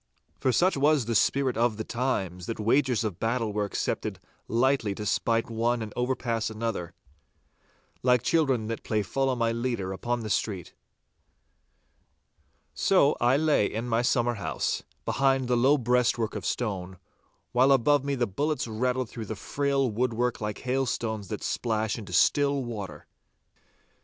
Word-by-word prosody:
For 130 - +2
such 180 +10 +3
was 145 -2 +3
the 115 - -1
spirit 135 +4 +2
of 115 -1 +1
the 110 - -3
times, 95 -8 -2
that 115 - -4
wagers 120 +2 +2
of 105 -6 -3
battle 115 -2 -1
were 105 0 0
accepted 100 - -2 0.3
lightly 120 -3 +1
to 105 - -5
spite 115 +2 +1
one 115 +1 0
and 105 - -8
overpass 120 -3 -1
another, 110 -6 -4 1.1
like 125 -1 +3
children 135 -7 +2
that 115 +1 -4
play 105 -1 -1
Follow 135 +6 0
my 115 -1 +1
leader 115 -5 -2
upon 120 +5 -2
the 110 -2 -4
street. 95 -5 -2 2.0
So 165 -7 +3
I 120 +3 +4
lay 150 -8 +3
in 115 +3 -3
my 115 0 +2
summer 120 0 +2
house, 105 - -2 0.2
behind 135 -2 +2
the 125 - +2
low 135 +5 +4
breastwork 120 -2 +1
of - - -3
stone, 95 -6 -3 0.5
while 130 +3 +4
above 135 +2 +4
me 140 0 -1
the 120 -2 +1
bullets 145 +8 -2
rattled 125 +3 -1
through 110 0 -7
the 110 - -5
frail 140 +4 0
woodwork 120 +1 -1
like 105 -1 -4
hailstones 120 -5 -1
that - - -5
splash 110 -3 -1
into 105 - -9
still 140 -1 +3
water. 100 -10 -6
120 Hz, 150 wpm, -27 LUFS, 110-130 Hz, 2.0 s, I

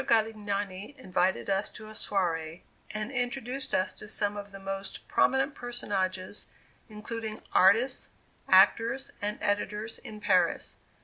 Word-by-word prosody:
Galignani 210 -1 0
invited 185 -6 +1
us 195 +1 +1
to 215 - -10
a 215 - -9
soiree 170 -6 -1 0.3
and 215 +3 -3
introduced 250 +1 -1
us 185 - +1
to 210 - -9
some 205 -1 -1
of 205 0 -6
the 195 - -9
most 195 0 -5
prominent 270 +2 +3
personages, 200 -7 -2 0.4
including 215 +1 -5
artists, 230 +8 +4 0.4
actors 235 +4 +5
and 210 +1 -1
editors, 210 +2 -1
in 215 -1 -9
Paris. 185 -5 +2
210 Hz, 125 wpm, -30 LUFS, 195-230 Hz, 0.4 s, actors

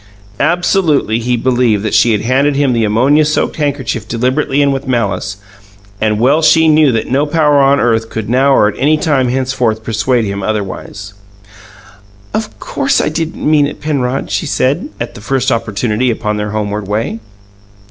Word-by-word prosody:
Absolutely, 160 - +1
he 120 +1 -1
believed 120 -4 +1
that 110 - -2
she 120 - +4
had 105 - 0
handed 135 +5 +1
him 140 -2 +1
the 115 -1 +1
ammonia 130 +9 +3
soaked 150 0 -1
handkerchief 135 -7 -2
deliberately 130 +5 0
and 140 -1 +2
with 135 0 -5
malice, 100 -5 -2 0.6
and 105 -1 +1
well 140 +7 +3
she 160 0 +4
knew 155 -2 +4
that 115 0 -2
no 140 +3 +1
power 150 -2 +2
on 140 +1 +3
earth 115 -1 0
could 110 -2 -5
now 130 +4 +2
or 105 - +4
at 105 - -2
any 150 +4 +3
time 145 -5 +1
henceforth 125 -3 -1
persuade 115 +2 0
him 100 0 -4
otherwise. 100 -1 -5 1.2
"Of 215 -1 -4
course 280 -1 0
I - - 0
didn't 160 0 -3
mean 150 -2 +3
it, 145 - -8
Penrod," 135 -4 -2
she - - -1
said, - - 0
at - - -5
the - - -11
first 130 +3 -1
opportunity 115 +2 -1
upon 105 -2 -2
their 105 0 -3
homeward 105 -1 -3
way. 110 +2 -2
125 Hz, 175 wpm, -14 LUFS, 110-145 Hz, 1.2 s, she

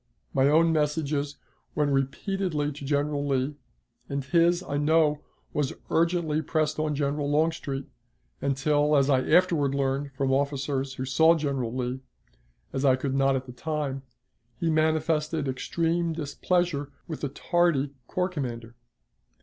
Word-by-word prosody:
My 135 +1 +4
own 165 +2 +4
messages 150 -1 0 0.4
went 145 -1 +1
repeatedly 150 +3 -1
to 140 0 -9
General 145 0 0
Lee, 135 +1 0 0.6
and 140 0 -2
his, 170 +4 +3
I 145 - -3
know, 150 0 +3 0.3
was 145 -3 0 0.2
urgently 165 -2 +1
pressed 155 0 -1
on 155 -1 0
General 145 0 -1
Longstreet, 145 -3 0 0.6
until, 145 +2 +2
as 140 +1 +3
I 130 -1 +4
afterward 160 -5 +3
learned 140 +1 0
from 135 0 +1
officers 140 -1 -1
who 130 - -4
saw 160 +6 +5
General 140 -7 -2
Lee, 125 0 -2 0.7
as 135 - -2
I 130 -2 +5
could 130 +1 -3
not 135 0 +3
at 130 0 -2
the 125 - -10
time, 145 -1 -3 0.6
he 165 - +1
manifested 155 -1 +1
extreme 165 +5 -1
displeasure 155 -1 -1 0.2
with 160 - -6
the 145 - -1
tardy 155 -2 +1 0.2
corps 180 0 -1
commander. 120 -8 -5
145 Hz, 140 wpm, -27 LUFS, 135-160 Hz, 0.7 s, saw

